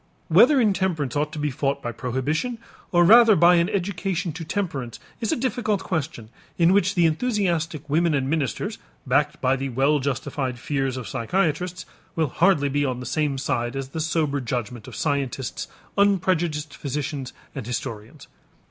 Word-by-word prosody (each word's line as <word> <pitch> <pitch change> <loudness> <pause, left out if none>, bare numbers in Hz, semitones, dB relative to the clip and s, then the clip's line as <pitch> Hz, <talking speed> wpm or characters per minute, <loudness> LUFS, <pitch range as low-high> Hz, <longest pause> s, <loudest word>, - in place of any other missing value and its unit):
Whether 295 -3 +6
intemperance 190 - +1
ought 150 +1 0
to - - -6
be 150 -1 -1
fought 140 +1 -1
by 120 - -2
prohibition 135 - -2 0.3
or 175 -1 +5
rather 230 +2 +8
by 175 +1 +6
an 170 +2 +2
education 190 -3 -2
to 165 +2 -6
temperance 150 - -3 0.2
is 225 - -1
a - - +2
difficult 235 -5 -1
question 155 - -3 0.3
in 170 +1 +5
which 200 0 +2
the 175 -2 +4
enthusiastic 170 - 0
women 160 +2 +2
and 135 -1 0
ministers, 140 -5 -2 0.3
backed - - +1
by 130 +1 +3
the 135 0 -3
well 135 +4 +2
justified 130 -1 -2
fears 135 -1 -2
of 125 - -6
psychiatrists, 180 +6 -1 0.3
will 160 -4 +1
hardly 165 0 +3
be 145 +1 0
on 130 -3 -1
the 125 - -7
same 145 +1 0
side 120 -2 -2
as 135 -1 -4
the 160 - -5
sober 155 -3 0
judgment 120 -2 -4
of - - -9
scientists, 140 -4 -2 0.3
unprejudiced 175 -6 +1
physicians, 140 -1 -4 0.2
and 130 -5 -6
historians. 115 +2 -6
150 Hz, 165 wpm, -24 LUFS, 135-180 Hz, 0.3 s, rather